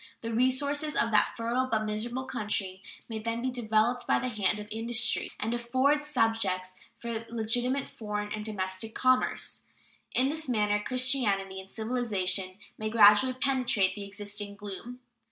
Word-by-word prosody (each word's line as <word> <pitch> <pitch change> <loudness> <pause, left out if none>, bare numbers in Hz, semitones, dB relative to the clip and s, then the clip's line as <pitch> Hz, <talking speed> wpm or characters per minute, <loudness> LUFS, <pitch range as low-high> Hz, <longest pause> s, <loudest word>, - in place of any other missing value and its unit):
The 230 0 -4
resources 280 +5 +1
of 230 - +1
that 210 - +3
fertile 240 +3 0
but 215 -1 +1
miserable 235 +4 -3
country 210 -6 -2 0.3
might 220 -2 -5
then 230 +1 -1
be 255 +2 -1
developed 235 0 +1
by - - +4
the 255 - -2
hand 210 -3 +1
of 210 0 -7
industry 225 +1 +1
and 225 +2 -1
afford 260 +5 +2
subjects 225 -9 0 0.2
for 230 -1 -4
legitimate 245 +4 0
foreign 210 -2 -5
and 215 - -4
domestic 195 0 -3
commerce. 255 0 +1 0.5
In 260 - +4
this 315 -1 -4
manner 210 -3 +2
Christianity 225 -7 +1
and 190 0 -11
civilization 200 -6 -2 0.2
may 215 0 -2
gradually 215 +3 +6
penetrate 255 -7 +1
the 205 - -7
existing 205 0 -5
gloom. 210 +5 -8
225 Hz, 150 wpm, -29 LUFS, 210-250 Hz, 0.5 s, gradually